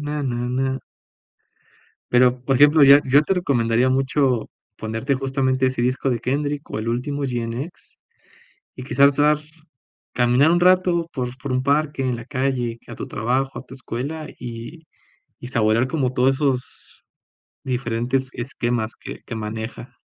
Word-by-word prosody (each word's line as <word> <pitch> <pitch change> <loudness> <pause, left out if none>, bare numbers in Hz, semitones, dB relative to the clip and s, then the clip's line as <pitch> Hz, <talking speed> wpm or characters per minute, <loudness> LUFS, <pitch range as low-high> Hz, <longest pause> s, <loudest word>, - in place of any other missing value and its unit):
na 150 0 -3
na 120 -2 -2
na." 130 +1 -1 1.3
Pero, 125 0 +4
por 135 -2 +2
ejemplo, 145 +2 +6
ya 140 +1 +9
yo 140 +3 +5
te 190 - 0
recomendaría 120 -7 +1
mucho 130 -2 +1 0.3
ponerte 115 +5 -2
justamente 130 -1 0
ese 130 -2 -1
disco 130 +2 0
de 120 - 0
Kendrick 145 +3 -2
o - - -3
el 110 +1 -3
último 140 +5 -2
GNX, 125 +5 -5 0.8
y 130 - -7
quizás 140 +2 +4
te 145 - +1
vas 150 0 +2 0.6
caminar 125 +5 +4
un 175 +1 +3
rato 180 -2 +3
por 125 -2 -4
por 130 0 -4
un 130 0 +1
parque 145 0 +1
en 125 -2 -1
la 115 - -8
calle, 130 -4 -2
que - - -16
a - - -6
tu - - -6
trabajo, 130 +5 -1
a - - -7
tu 130 - -13
escuela, 140 +5 -5
y 120 +7 -8 0.6
y 125 - -8
saborear 115 +1 +2
como 130 -4 -1
todos 130 +2 +3
esos 135 -3 -3 0.6
diferentes 125 +1 -1
esquemas 120 -2 -2
que - - -8
que 115 - -6
maneja. 110 +1 -6
130 Hz, 160 wpm, -22 LUFS, 120-140 Hz, 1.3 s, ya